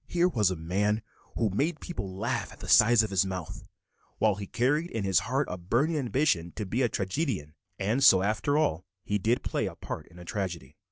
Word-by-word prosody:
Here 175 0 +2
was 110 - +2
a 90 - -2
man 100 +6 0 0.3
who 110 -4 +1
made 150 - 0
people 100 - -6
laugh 120 +4 -2
at - - -14
the - - -8
size 115 +1 +6
of 110 - -4
his 95 0 +3
mouth, 95 -4 -5 0.6
while 110 -2 +3
he 100 0 -7
carried 145 - +1
in 110 - -3
his 95 -1 +3
heart 135 +2 +1
a 90 - -5
burning 120 - +1
ambition 130 - 0
to 105 - -4
be 115 +7 -1
a 120 - +2
tragedian; 95 - -2 0.2
and 110 +8 0
so 95 -8 +7
after 110 +8 +1
all 90 - +1 0.2
he 105 0 -1
did 115 +5 +1
play - - -1
a - - -7
part - - -7
in 85 - -17
a 90 - -11
tragedy. 85 -8 -4
105 Hz, 215 wpm, -28 LUFS, 95-130 Hz, 0.6 s, so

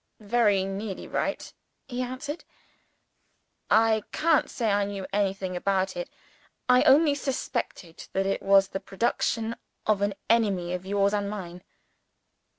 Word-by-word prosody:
"Very 210 -2 +2
nearly 195 +1 -5
right," - - -3 0.3
he 250 -1 -3
answered. 275 +5 -5 1.3
"I 220 0 +4
can't 320 -2 +2
say 230 -4 -1
I 200 0 +2
knew 200 -1 -4
anything 195 -2 -1
about 190 +1 0
it. 175 - -4 0.6
I 250 0 +6
only 290 +2 +6
suspected 250 - -4
that 195 0 +1
it 195 - -1
was 195 0 +5
the 195 - -4
production 225 +3 -1 0.3
of 210 -2 +2
an 200 -1 0
enemy 200 -6 +2
of 180 +1 -5
yours 200 0 +2
and 205 -1 0
mine." 180 -4 -7
205 Hz, 135 wpm, -27 LUFS, 195-235 Hz, 1.3 s, I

